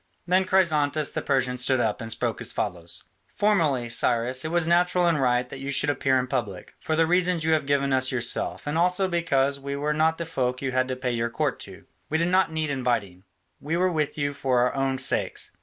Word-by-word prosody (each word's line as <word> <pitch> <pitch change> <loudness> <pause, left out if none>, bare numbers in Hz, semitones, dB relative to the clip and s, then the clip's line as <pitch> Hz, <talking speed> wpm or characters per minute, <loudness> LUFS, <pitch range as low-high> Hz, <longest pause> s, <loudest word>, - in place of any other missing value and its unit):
Then 185 +2 +2
Chrysantas 155 -6 +1
the - - -2
Persian 125 -1 0
stood 130 0 +2
up 115 0 -1
and 115 - -6
spoke - - -2
as - - +1
follows: 90 -4 -4 0.3
"Formerly, 160 - +1
Cyrus, 120 +2 0
it 155 - -3
was 170 0 +1
natural 175 +1 +3
and 165 -4 +2
right 125 -1 +1
that 135 +1 -9
you 135 +1 -5
should 140 +1 +1
appear 135 -1 +1
in 125 - 0
public, 120 -8 -4
for 155 - -2
the 165 +1 +3
reasons 180 0 +1
you 160 - +1
have 155 -3 0
given 140 -1 +1
us 130 0 +2
yourself, 125 -2 -1
and 150 +3 -1
also 180 +2 +2
because 140 -6 0
we 140 0 -5
were 150 +2 -1
not 160 +1 +2
the 170 - -4
folk 125 -5 -2
you 135 -1 -3
had 130 0 +1
to 130 - -3
pay 125 -1 -2
your 115 0 -1
court - - -2
to. - - -10 0.2
We 160 - +1
did 170 +2 +1
not 185 -2 +2
need 155 -2 -2
inviting: 115 -9 -2 0.3
we 160 +4 -2
were 185 +1 +2
with 155 -3 -2
you 145 -1 -1
for 130 -3 +1
our 125 - +1
own 135 -1 -1
sakes. - - -1
140 Hz, 225 wpm, -25 LUFS, 125-165 Hz, 0.3 s, natural